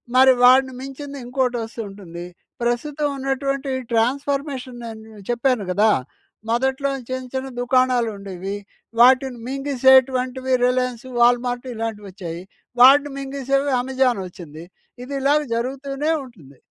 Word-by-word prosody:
మరి 260 +1 +7
వాడిని 260 +1 +6
మించిందింకోటొస్తూంటుంది. 245 - -5 0.4
ప్రస్తుతం 280 +5 -1
ఉన్నటువంటి 275 0 -2 0.2
ట్రాన్స్ఫర్మేషన్ 265 +1 -1
నేను 220 -2 -10
చెప్పాను 240 -3 +1
గదా! 210 +4 +4 0.6
మొదట్లో 265 +3 0 0.2
చిన్న, 255 0 -3
చిన్న 265 0 -3
దుకాణాలుండేవి. 225 -7 0 0.5
వాటిని 255 0 +5
మింగిసేటువంటివి 260 -1 +2
రిలయన్సు, 250 -1 -1
వాల్‌మార్టు, 245 +1 +2
ఇలాంటివొచ్చాయి. 205 -6 -6 0.4
వాటిని 280 +3 +7
మింగిసేవి 275 0 -1
అమెజానొచ్చింది. 195 - -2 0.4
ఇది 270 +3 -7
ఇలాగ 290 +2 +3
జరుగుతూనే 275 +5 -2
ఉంటుంది. 155 - -16
255 Hz, 90 wpm, -21 LUFS, 225-270 Hz, 0.6 s, మరి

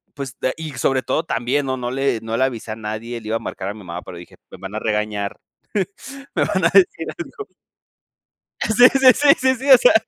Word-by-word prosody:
pues, 135 -3 -6
da 130 - +1
y 160 -1 -6
sobre 130 +1 0
todo 160 - 0
también, 135 -2 -1
¿no? 130 0 -1
No 120 -1 -4
le 135 -3 0
no 115 0 -3
le 130 - +2
avisa 115 -4 -4
a - - -7
nadie, 110 +2 -6
le 110 - -10
iba 110 - -1
a - - -8
marcar 95 - -5
a - - -4
mi 110 - -12
mamá, 85 0 -6
pero 90 - -10
dije: 85 - -13 0.2
"Me - - -10
van 95 +2 -8
a - - -1
regañar, 105 -2 -2 1.0
me - - +2
van 190 -3 -1
a 170 - +4
decir 180 -4 +4
algo". 410 - -8 1.1
Sí, 220 - 0 0.2
sí, 265 -1 +6
sí, 290 0 +2
sí, 260 0 +2
sí. 265 +3 -4
O 260 - +11
sea, 245 - +5
125 Hz, 230 wpm, -20 LUFS, 110-165 Hz, 1.1 s, O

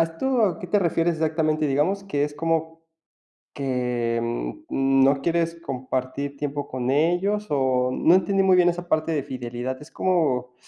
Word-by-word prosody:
a - - +7
esto 210 +5 0
qué - - -6
te 205 +4 +2
refieres 170 -2 +1
exactamente? 155 -1 0
Digamos 155 +9 0
que 145 -7 0
es 145 0 -5
como 165 +1 -2 0.7
que, 125 -3 -1 0.5
mm, 135 0 +3
no 135 0 +3
quieres 170 0 0
compartir 130 +2 -4
tiempo 145 0 -3
con 125 0 -2
ellos 175 +8 +1
o 130 -3 +1
no 165 +7 +4
entendí 195 +1 +2
muy 190 -1 +5
bien 175 -1 +5
esa 175 0 -4
parte 155 0 0
de 145 -4 -1
fidelidad, 125 -1 -5
¿es 150 - -13
como, 135 -9 0
155 Hz, 165 wpm, -24 LUFS, 130-170 Hz, 0.7 s, a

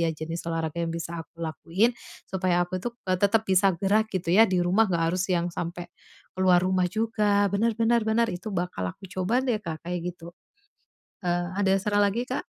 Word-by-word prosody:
ya 165 - +2
jenis 165 +2 -5
olahraga 165 0 -2
yang 165 - -3
bisa 170 0 -4
aku 165 +2 -11
lakuin 170 +7 +1 0.4
supaya 185 -2 +1
aku 180 +1 -4
itu, 240 - -2 0.2
eee, 185 -1 +1
tetap 215 +2 +3
bisa 190 -1 +3
gerak 205 +5 +2
gitu 170 -2 -1
ya 225 +4 +7
di 185 -1 +1
rumah, 195 +5 +3
nggak 170 -3 +1
harus 185 +1 0
yang 175 -1 0
sampai 175 +1 -5 0.4
ke - - -20
luar 180 -1 +5
rumah 185 -1 +2
juga. 210 -1 +1
Bener 225 +3 +1
bener 230 0 +3
bener, 230 +1 +2
itu 180 +5 -6
bakal 175 - -2
aku 195 - -16
coba 210 +8 0
deh, 240 -5 +1
Kak, 160 -5 -6
kayak 175 0 -3
gitu. 170 -1 -11 0.9
Eee, 175 0 -1
ada 195 -1 +3
saran 205 +1 +1
lagi, 205 +5 +1
Kak? - - -3
185 Hz, 200 wpm, -26 LUFS, 170-205 Hz, 0.9 s, ya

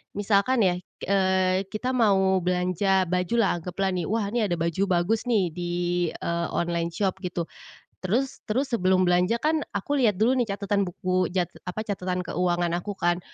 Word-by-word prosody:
misalkan 205 +4 +2
ya, 180 -2 +3 0.3
eee, 190 -1 +2
kita 240 +5 -3
mau 190 -6 +3
belanja 180 +2 +1
baju 180 +4 -1
lah, 200 -6 +2
anggaplah 185 +3 -2
nih, 175 -3 -2
"wah 210 -1 -1
ini 240 - 0
ada 175 - 0
baju 170 +3 -1
bagus 190 +7 +1
nih, 195 -8 +2
di, 175 +1 -4 0.4
eee, 170 0 -2
online 170 -1 0
shop" 190 +2 -2
gitu, 180 -2 -3 0.6
terus 245 +9 -1
terus 260 +6 -1
sebelum 185 -4 +2
belanja 180 +7 +2
kan 310 +1 +2 0.2
aku 290 0 -1
lihat 220 -6 +3
dulu 255 +3 +3
nih 220 -5 0
catatan 200 -1 0
buku, 185 0 0
jat 180 -3 0 0.2
apa, 195 +4 -3
catatan 185 -3 -3
keuangan 175 -1 0
aku 205 +3 -5
kan. 175 -1 +1
190 Hz, 170 wpm, -26 LUFS, 180-210 Hz, 0.6 s, ya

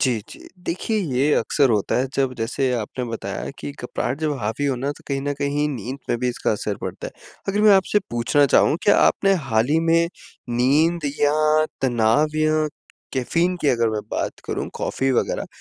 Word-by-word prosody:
जी, 125 -4 +2
जी। - - -12 0.2
देखिए, 185 +6 -2
ये 145 -5 +1
अक्सर 140 -4 +2
होता 105 -3 +1
है 130 - +1
जब 135 -2 +1
जैसे 125 +3 -1
आपने 120 +2 -3
बताया 115 -2 -5
कि 75 - -5
घबराहट 130 - -4
जब 155 -1 0
हावी 110 +7 -2
हो 135 -2 0
ना, 135 +3 -2
तो - - -18
कहीं 135 -1 -1
न 145 +1 -1
कहीं 145 +1 0
नींद 130 0 -5
में - - +1
भी 125 - 0
इसका 120 - -1
असर 105 -1 -3
पड़ता - - -5
है। - - -9 0.4
अगर 200 +1 +1
मैं 215 - +7
आपसे 190 +2 +3
पूछना 120 +5 +2
चाहूँ, 145 - +4
क्या 205 - +5
आपने 195 - +3 0.2
हाल 110 +1 +3
ही 160 - +4
में 165 0 +3 0.5
नींद 150 +6 +2 0.2
या 155 +1 +3 0.2
तनाव 130 +5 +2
या 155 0 +2 0.5
कैफ़ीन 170 +8 0
की 145 - +2
अगर 115 -2 +2
मैं 110 -1 -2
बात - - -3
करूँ - - -3
कॉफ़ी 135 0 -1
वगैरह - - 0
140 Hz, 190 wpm, -22 LUFS, 120-155 Hz, 0.5 s, मैं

